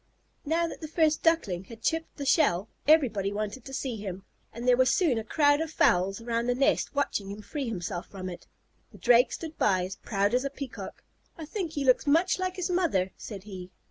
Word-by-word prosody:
Now 330 Hz, +3 st, +1 dB
that 335 Hz, -, -7 dB
the 310 Hz, -, -5 dB
first 315 Hz, -1 st, +2 dB
Duckling 200 Hz, -, +1 dB
had 225 Hz, +1 st, -12 dB
chipped 325 Hz, 0 st, -1 dB
the 285 Hz, -, -4 dB
shell, 225 Hz, -, +3 dB, 0.2 s
everybody 235 Hz, -11 st, +4 dB
wanted 210 Hz, +4 st, -4 dB
to 270 Hz, -, -8 dB
see 265 Hz, -3 st, -3 dB
him, 195 Hz, -2 st, -6 dB, 0.3 s
and 235 Hz, +2 st, -6 dB
there 250 Hz, -, +6 dB
was 255 Hz, +1 st, +4 dB
soon 275 Hz, -7 st, +2 dB
a -, -, -5 dB
crowd 290 Hz, +5 st, +3 dB
of 320 Hz, -, -2 dB
fowls 195 Hz, -, +2 dB
around 230 Hz, 0 st, -2 dB
the 245 Hz, -, +2 dB
nest 275 Hz, +2 st, +1 dB
watching 215 Hz, -8 st, -1 dB
him 205 Hz, +1 st, -7 dB
free 280 Hz, +3 st, -4 dB
himself 175 Hz, -5 st, -4 dB
from 185 Hz, -2 st, -7 dB
it. 175 Hz, -1 st, -8 dB, 0.4 s
The -, -, -14 dB
Drake 245 Hz, 0 st, +5 dB
stood 320 Hz, -1 st, -7 dB
by, 185 Hz, -3 st, +2 dB
as 190 Hz, +1 st, -7 dB
proud 200 Hz, 0 st, 0 dB
as 250 Hz, +1 st, +2 dB
a 275 Hz, -, -1 dB
Peacock. 275 Hz, -2 st, -8 dB, 0.3 s
"I 320 Hz, -, -6 dB
think 345 Hz, -1 st, -4 dB
he 285 Hz, -2 st, -2 dB
looks 255 Hz, +2 st, +3 dB
much 335 Hz, +6 st, +3 dB
like 370 Hz, 0 st, -2 dB
his 365 Hz, -1 st, -2 dB
mother," 300 Hz, -, +1 dB
said 200 Hz, -4 st, -8 dB
he. 185 Hz, -3 st, -9 dB
250 Hz, 215 wpm, -28 LUFS, 200-310 Hz, 0.4 s, there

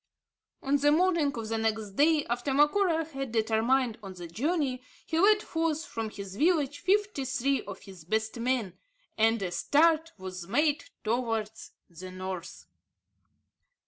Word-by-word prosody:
On 280 Hz, +1 st, +2 dB
the 290 Hz, +1 st, +3 dB
morning 335 Hz, -3 st, +3 dB
of 225 Hz, -1 st, -4 dB
the 225 Hz, 0 st, -1 dB
next 220 Hz, -2 st, -1 dB
day 300 Hz, +7 st, +3 dB
after 245 Hz, +3 st, -2 dB
Macora 325 Hz, +3 st, +3 dB
had 270 Hz, -5 st, -6 dB
determined 230 Hz, +2 st, +1 dB
on 195 Hz, -2 st, -9 dB
the 175 Hz, -1 st, -8 dB
journey, 260 Hz, -, -1 dB, 0.2 s
he 320 Hz, -, -1 dB
led 420 Hz, +3 st, +5 dB
forth 325 Hz, -1 st, -1 dB
from 225 Hz, -4 st, -4 dB
his 200 Hz, -2 st, -8 dB
village 295 Hz, -3 st, +2 dB
fifty 405 Hz, -5 st, +1 dB
three 270 Hz, +1 st, 0 dB
of 200 Hz, -1 st, -8 dB
his 190 Hz, -4 st, -12 dB
best 220 Hz, +6 st, -2 dB
men; 235 Hz, -6 st, -1 dB, 0.4 s
and 225 Hz, +1 st, +3 dB
a 180 Hz, -, -2 dB
start 320 Hz, -, +3 dB
was 185 Hz, -2 st, -7 dB
made 295 Hz, +7 st, +1 dB, 0.2 s
towards 225 Hz, -1 st, -2 dB
the 180 Hz, +2 st, -10 dB
North. 185 Hz, -1 st, -7 dB
250 Hz, 145 wpm, -29 LUFS, 215-305 Hz, 0.4 s, led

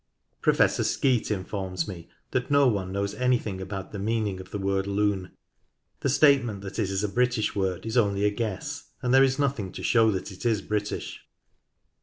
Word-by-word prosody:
Professor -, -, +3 dB
Skeat 130 Hz, -4 st, +1 dB
informs 95 Hz, -3 st, -3 dB
me 85 Hz, -4 st, -8 dB, 0.2 s
that 125 Hz, -1 st, -1 dB
no 140 Hz, -1 st, +5 dB
one 100 Hz, -5 st, 0 dB
knows 100 Hz, +1 st, -2 dB
anything 115 Hz, -5 st, 0 dB
about 95 Hz, 0 st, -6 dB
the 100 Hz, -, -6 dB
meaning 105 Hz, -2 st, -1 dB
of 95 Hz, 0 st, -10 dB
the -, -, -4 dB
word 95 Hz, 0 st, -1 dB
Lune. 100 Hz, -2 st, 0 dB, 0.7 s
The 140 Hz, -, 0 dB
statement 135 Hz, -7 st, +4 dB
that 100 Hz, +3 st, -6 dB
it 105 Hz, -4 st, 0 dB
is 95 Hz, +1 st, -1 dB
a -, -, +2 dB
British 120 Hz, 0 st, 0 dB
word 95 Hz, -1 st, -1 dB
is 115 Hz, +2 st, -2 dB
only 100 Hz, -3 st, +2 dB
a 105 Hz, -, +3 dB
guess, 115 Hz, +7 st, -4 dB
and 125 Hz, 0 st, +1 dB
there 135 Hz, 0 st, +7 dB
is 135 Hz, 0 st, +2 dB
nothing 135 Hz, -10 st, -1 dB
to -, -, -7 dB
show 115 Hz, -2 st, +4 dB
that 100 Hz, 0 st, -3 dB
it 95 Hz, -, -10 dB
is 110 Hz, -4 st, +1 dB
British. 105 Hz, -1 st, -3 dB
105 Hz, 190 wpm, -26 LUFS, 95-120 Hz, 0.7 s, there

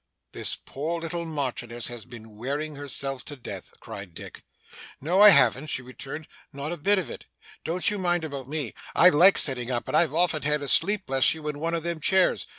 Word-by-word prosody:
'This -, -, 0 dB
poor 160 Hz, +5 st, -4 dB
little 170 Hz, +1 st, -3 dB
Marchioness 120 Hz, -6 st, -4 dB
has 120 Hz, -3 st, -6 dB
been 115 Hz, -3 st, -13 dB
wearing 145 Hz, +7 st, -4 dB
herself 135 Hz, -2 st, -4 dB
to 145 Hz, -, -5 dB
death!' 130 Hz, -, -9 dB
cried 100 Hz, -4 st, -10 dB
Dick. -, -, -10 dB, 0.6 s
'No 175 Hz, +8 st, +1 dB
I 210 Hz, -, +10 dB
haven't,' 130 Hz, -, +4 dB
she 130 Hz, -3 st, -2 dB
returned, 135 Hz, +4 st, -9 dB, 0.2 s
'not 140 Hz, +3 st, -6 dB
a 175 Hz, -, -4 dB
bit 200 Hz, +7 st, +2 dB
of 185 Hz, -, -3 dB
it. -, -, -10 dB, 0.4 s
Don't 175 Hz, +2 st, -2 dB
you 210 Hz, -, -3 dB
mind 175 Hz, -2 st, 0 dB
about 140 Hz, -4 st, -7 dB
me. 145 Hz, -6 st, -3 dB, 0.2 s
I 180 Hz, -, +7 dB
like 180 Hz, +4 st, +5 dB
sitting 125 Hz, -4 st, +1 dB
up, 120 Hz, -2 st, -3 dB
and -, -, -2 dB
I've 160 Hz, -2 st, +3 dB
often 165 Hz, -3 st, +2 dB
had 150 Hz, 0 st, 0 dB
a -, -, -4 dB
sleep, 205 Hz, +6 st, +5 dB
bless 135 Hz, +3 st, +3 dB
you, 155 Hz, -1 st, -8 dB
in 145 Hz, -1 st, -6 dB
one 165 Hz, +2 st, -2 dB
of 165 Hz, -, -3 dB
them 170 Hz, -1 st, -2 dB
chairs. 190 Hz, +4 st, +2 dB
150 Hz, 210 wpm, -25 LUFS, 130-170 Hz, 0.6 s, I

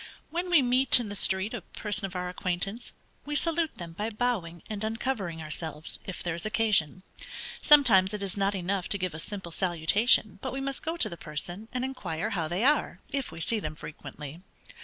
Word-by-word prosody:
When 350 Hz, +2 st, -2 dB
we 335 Hz, -6 st, +6 dB
meet, 255 Hz, +1 st, +6 dB
in 230 Hz, -4 st, -4 dB
the 205 Hz, -, -5 dB
street, 190 Hz, +1 st, +4 dB
a -, -, -4 dB
person 205 Hz, -2 st, -2 dB
of 185 Hz, -, -12 dB
our 180 Hz, 0 st, -2 dB
acquaintance, 185 Hz, +5 st, -3 dB, 0.3 s
we 295 Hz, 0 st, -4 dB
salute 325 Hz, +1 st, +1 dB
them 170 Hz, -2 st, -7 dB
by 210 Hz, +6 st, -2 dB
bowing 210 Hz, -8 st, -2 dB
and 215 Hz, -1 st, -4 dB
uncovering 220 Hz, -7 st, -2 dB
ourselves, 155 Hz, 0 st, -6 dB
if 185 Hz, -, -5 dB
there 175 Hz, -, -1 dB
is 170 Hz, -, -3 dB
occasion. 215 Hz, -7 st, +2 dB, 0.6 s
Sometimes 230 Hz, -, +6 dB
it 210 Hz, -1 st, -3 dB
is 195 Hz, -2 st, -4 dB
not 200 Hz, 0 st, +1 dB
enough 185 Hz, 0 st, -1 dB
to 200 Hz, -, +3 dB
give 185 Hz, -3 st, -2 dB
a 155 Hz, -, -6 dB
simple 190 Hz, 0 st, -6 dB
salutation, 190 Hz, +5 st, +3 dB
but -, -, -4 dB
we 270 Hz, -, -3 dB
must 270 Hz, 0 st, -3 dB
go 325 Hz, +2 st, -2 dB
to -, -, +4 dB
the 170 Hz, -, -7 dB
person 175 Hz, +7 st, -5 dB
and 255 Hz, 0 st, -1 dB
inquire 205 Hz, -9 st, -3 dB
how 170 Hz, -6 st, -1 dB
they 175 Hz, +7 st, -1 dB
are, 295 Hz, +3 st, +3 dB
if 275 Hz, -, -2 dB
we 165 Hz, -, -8 dB
see 215 Hz, +7 st, 0 dB
them 155 Hz, -5 st, -4 dB
frequently. 150 Hz, +1 st, -9 dB
200 Hz, 200 wpm, -28 LUFS, 170-245 Hz, 0.6 s, we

